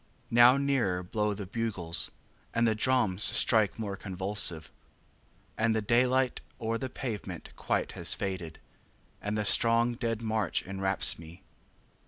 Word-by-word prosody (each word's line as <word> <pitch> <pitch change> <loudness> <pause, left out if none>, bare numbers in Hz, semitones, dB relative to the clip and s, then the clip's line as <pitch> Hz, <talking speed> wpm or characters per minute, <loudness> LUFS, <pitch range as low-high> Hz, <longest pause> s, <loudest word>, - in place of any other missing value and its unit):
6. - - -31
Now 120 +3 +6
nearer 130 -11 0
blow 105 +3 -2
the 100 0 -7
bugles, 95 -5 -1 0.5
And 115 0 +2
the 110 - +2
drums 110 -4 +1
strike 110 -2 +4
more 105 -3 -4
convulsive; 95 -4 0 0.9
And 110 0 +2
the 110 - 0
daylight 125 +3 +1 0.2
o'er 115 -1 -2
the 130 - -4
pavement 105 -9 -6
quite - - -2
has - - 0
faded, 90 -5 -5 0.6
And 105 +1 -3
the 105 - -1
strong 115 +2 +3
dead 115 -1 -3
march 110 -5 -1
enwraps 95 -1 +2
me. 85 +2 -13
110 Hz, 140 wpm, -29 LUFS, 95-115 Hz, 0.9 s, Now